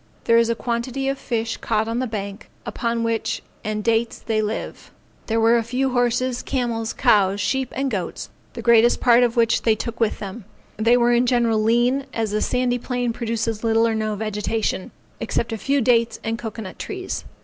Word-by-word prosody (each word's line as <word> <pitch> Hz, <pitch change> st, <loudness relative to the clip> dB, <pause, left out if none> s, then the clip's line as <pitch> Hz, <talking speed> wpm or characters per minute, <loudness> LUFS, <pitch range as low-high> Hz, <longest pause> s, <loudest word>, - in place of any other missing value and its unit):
There 230 Hz, 0 st, +5 dB
is 230 Hz, 0 st, +2 dB
a 230 Hz, -, +1 dB
quantity 245 Hz, +3 st, -2 dB
of 275 Hz, 0 st, -2 dB
fish 230 Hz, -2 st, -2 dB
caught 215 Hz, +1 st, -1 dB
on 230 Hz, +1 st, -1 dB
the 255 Hz, -, -1 dB
bank, 200 Hz, -1 st, -6 dB, 0.2 s
upon 235 Hz, -2 st, -2 dB
which 225 Hz, -1 st, -1 dB, 0.2 s
and 215 Hz, -1 st, -3 dB
dates 230 Hz, +1 st, +1 dB
they 220 Hz, -1 st, -1 dB
live. 215 Hz, +1 st, -5 dB, 0.4 s
There 225 Hz, 0 st, +1 dB
were 230 Hz, +1 st, +5 dB
a -, -, -2 dB
few 255 Hz, +3 st, -1 dB
horses, 245 Hz, 0 st, +1 dB
camels, 235 Hz, -4 st, -2 dB
cows, 200 Hz, -1 st, +3 dB
sheep, 265 Hz, +4 st, -1 dB
and 270 Hz, 0 st, -1 dB
goats; 185 Hz, -6 st, -4 dB, 0.2 s
the 235 Hz, -, -7 dB
greatest 235 Hz, 0 st, +5 dB
part 240 Hz, -1 st, +5 dB
of 240 Hz, -1 st, +1 dB
which 230 Hz, -1 st, +3 dB
they 225 Hz, -2 st, +3 dB
took 235 Hz, +2 st, -5 dB
with 225 Hz, -2 st, +1 dB
them; 200 Hz, +1 st, -7 dB, 0.3 s
they 230 Hz, +3 st, +4 dB
were 240 Hz, 0 st, +3 dB
in 240 Hz, +1 st, +3 dB
general 235 Hz, -3 st, +2 dB
lean, 240 Hz, +5 st, +2 dB
as 225 Hz, -2 st, -1 dB
the 215 Hz, 0 st, 0 dB
sandy 250 Hz, -1 st, 0 dB
plain 245 Hz, -1 st, -2 dB
produces 230 Hz, -1 st, -2 dB
little 225 Hz, 0 st, +3 dB
or 225 Hz, -, 0 dB
no 215 Hz, -1 st, -1 dB
vegetation, 215 Hz, -1 st, -2 dB, 0.3 s
except 230 Hz, 0 st, -2 dB
a -, -, -2 dB
few 280 Hz, +4 st, +1 dB
dates 230 Hz, -1 st, +2 dB
and 225 Hz, +1 st, -2 dB
cocoa 225 Hz, -1 st, -6 dB
nut 185 Hz, -, -9 dB
trees. 380 Hz, -2 st, -5 dB
230 Hz, 195 wpm, -22 LUFS, 220-245 Hz, 0.4 s, There